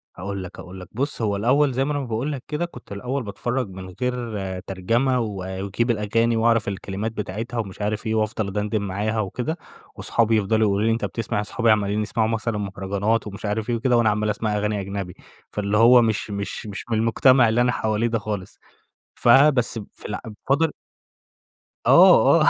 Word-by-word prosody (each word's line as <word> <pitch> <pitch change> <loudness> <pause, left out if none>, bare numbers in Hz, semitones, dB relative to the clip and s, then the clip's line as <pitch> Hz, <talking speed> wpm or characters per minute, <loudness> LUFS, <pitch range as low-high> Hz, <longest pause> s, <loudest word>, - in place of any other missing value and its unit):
هاقول 100 +1 -5
لك، 90 - -10
هاقول 95 +1 -9
لك، 90 - -10
بُص 140 +2 -3
هو 105 -2 +1
الأوّل 135 +7 +3
زي 135 +2 +1
ما 150 - -1
أنا 145 - -1
ما 135 - -4
باقول 120 +5 -2
لك 135 -3 -5
كده 150 +3 -2
كنت 125 -11 -13
الأوّل 125 +6 -3
باتفرّج 120 +3 -3
من 95 0 -9
غير 110 -7 -3
ترجمة، 115 +8 0
واجيب 100 +2 -2
الأغاني 115 +2 +1
وأعرف 115 -1 +2
الكلمات 100 +2 -3
بتاعتها 110 +3 -5
ومش 100 -1 -5
عارف 105 +2 -2
إيه، 110 - 0
وأفضل 110 -1 0
أدندن 105 +2 -1
معاها 105 +3 -2
وكده، 125 - -2 0.4
واصحابي 115 -1 +1
يفضلوا 110 +1 +2
يقولوا 100 +2 +1
لي 115 - +3
أنت 115 - -1
بتسمع 105 -2 -2
اصحابي 115 +2 +1
عمالين 105 0 +1
يسمعوا 110 +1 0
مثلًا 115 -1 -1
مهرجانات 100 +2 -1
ومش 100 +1 -7
عارف 105 +2 -2
إيه 120 - +1
وكده، 120 +1 +2
وأنا 115 -2 +4
عمّال 105 +1 0
اسمع 105 0 -1
أغاني 105 0 -1
أجنبي 95 -2 -5 0.4
فاللي 105 0 -1
هو 120 +2 +7
مش 110 -2 -1
مش 100 +2 -5
مش 100 -1 -6
من 110 - +1
المجتمع 120 +2 +4
اللي 115 +2 +2
أنا 125 0 +3
حواليه 110 0 0
ده 115 -1 0
خالص، 105 -3 -5 0.6
فبس 125 -1 +4 0.2
فال - - -6 0.3
فاضل 150 +4 +3 1.2
آه - - +7
آه، - - +4
110 Hz, 185 wpm, -23 LUFS, 100-120 Hz, 1.2 s, هو